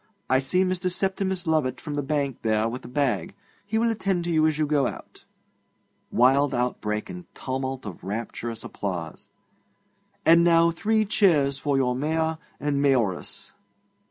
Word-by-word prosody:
I 130 Hz, -, +5 dB
see 180 Hz, +8 st, +1 dB
Mr. 185 Hz, 0 st, -1 dB
Septimus 190 Hz, 0 st, -1 dB
Lovatt 150 Hz, -6 st, +1 dB
from 150 Hz, -, -6 dB
the 145 Hz, -, -1 dB
bank 140 Hz, -2 st, -1 dB
there 110 Hz, 0 st, +1 dB
with 120 Hz, +3 st, -5 dB
a -, -, -9 dB
bag. 140 Hz, +7 st, -1 dB, 0.3 s
He 220 Hz, +1 st, 0 dB
will 230 Hz, +1 st, +2 dB
attend 195 Hz, -5 st, -1 dB
to 170 Hz, -, -2 dB
you 155 Hz, 0 st, +4 dB
as 155 Hz, -2 st, 0 dB
you 155 Hz, -, +2 dB
go 145 Hz, -3 st, +2 dB
out. -, -, -9 dB, 0.8 s
(Wild 135 Hz, +3 st, +3 dB
outbreak 105 Hz, -3 st, -1 dB
and 180 Hz, -1 st, -8 dB
tumult 130 Hz, -1 st, -4 dB
of 95 Hz, -5 st, -8 dB
rapturous 115 Hz, +3 st, -4 dB
applause.) 85 Hz, -5 st, -5 dB, 1.0 s
And 170 Hz, +1 st, +7 dB
now 170 Hz, -1 st, +5 dB
three 215 Hz, +5 st, +1 dB
cheers 150 Hz, -10 st, +3 dB
for 140 Hz, +1 st, 0 dB
your 125 Hz, -2 st, +2 dB
Mayor 160 Hz, +3 st, -1 dB, 0.2 s
and 145 Hz, -1 st, 0 dB
Mayoress!' 120 Hz, -10 st, 0 dB
145 Hz, 155 wpm, -25 LUFS, 125-175 Hz, 1.0 s, And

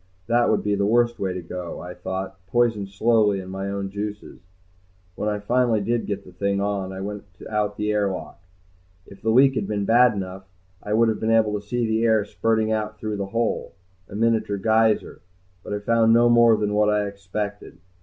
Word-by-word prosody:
That 120 Hz, +3 st, +2 dB
would -, -, +1 dB
be 105 Hz, -, 0 dB
the 100 Hz, 0 st, 0 dB
worst 120 Hz, +1 st, +2 dB
way 95 Hz, -1 st, -1 dB
to 90 Hz, -1 st, -5 dB
go, 90 Hz, +1 st, -6 dB
I 90 Hz, 0 st, -7 dB
thought, 95 Hz, +1 st, -6 dB
poisoned 115 Hz, -2 st, +1 dB
slowly 105 Hz, 0 st, +2 dB
in 95 Hz, 0 st, -8 dB
my 95 Hz, +1 st, -4 dB
own 100 Hz, -1 st, -4 dB
juices. 105 Hz, +1 st, -6 dB, 0.7 s
When 105 Hz, +3 st, -2 dB
I 105 Hz, -, -1 dB
finally 120 Hz, +2 st, +1 dB
did 115 Hz, +3 st, -1 dB
get 100 Hz, -1 st, -3 dB
the 90 Hz, -, -13 dB
thing 100 Hz, +2 st, -1 dB
on, 100 Hz, -1 st, -2 dB
I 95 Hz, 0 st, -6 dB
went 105 Hz, +1 st, -6 dB, 0.2 s
out 105 Hz, -1 st, -1 dB
the 105 Hz, 0 st, -1 dB
air 105 Hz, -1 st, +1 dB
lock. 95 Hz, -, -7 dB, 0.6 s
If 100 Hz, 0 st, -15 dB
the 110 Hz, -, -1 dB
leak 135 Hz, +4 st, +5 dB
had 105 Hz, -6 st, -2 dB
been 100 Hz, -1 st, -2 dB
bad 120 Hz, +3 st, +5 dB
enough, 95 Hz, 0 st, -6 dB, 0.4 s
I 105 Hz, -, -3 dB
would 115 Hz, +1 st, +4 dB
have 110 Hz, -, -1 dB
been 110 Hz, -, -1 dB
able 110 Hz, -2 st, +3 dB
to 105 Hz, -, -24 dB
see 120 Hz, +1 st, -1 dB
the 110 Hz, 0 st, 0 dB
air 110 Hz, -3 st, +3 dB
spurting 110 Hz, +1 st, 0 dB
out 105 Hz, -1 st, -2 dB
through 105 Hz, -1 st, -4 dB
the 100 Hz, -1 st, -3 dB
hole, 115 Hz, +2 st, -2 dB, 0.4 s
a -, -, -9 dB
miniature 110 Hz, -2 st, +1 dB
geyser. 110 Hz, +2 st, +1 dB, 0.4 s
But -, -, -8 dB
I -, -, -1 dB
found 115 Hz, +2 st, +3 dB
no 120 Hz, +1 st, +5 dB
more 120 Hz, -1 st, +6 dB
than 105 Hz, -1 st, -1 dB
what 105 Hz, 0 st, +3 dB
I 105 Hz, 0 st, +1 dB
expected. 100 Hz, -1 st, -6 dB
105 Hz, 210 wpm, -23 LUFS, 100-115 Hz, 0.7 s, more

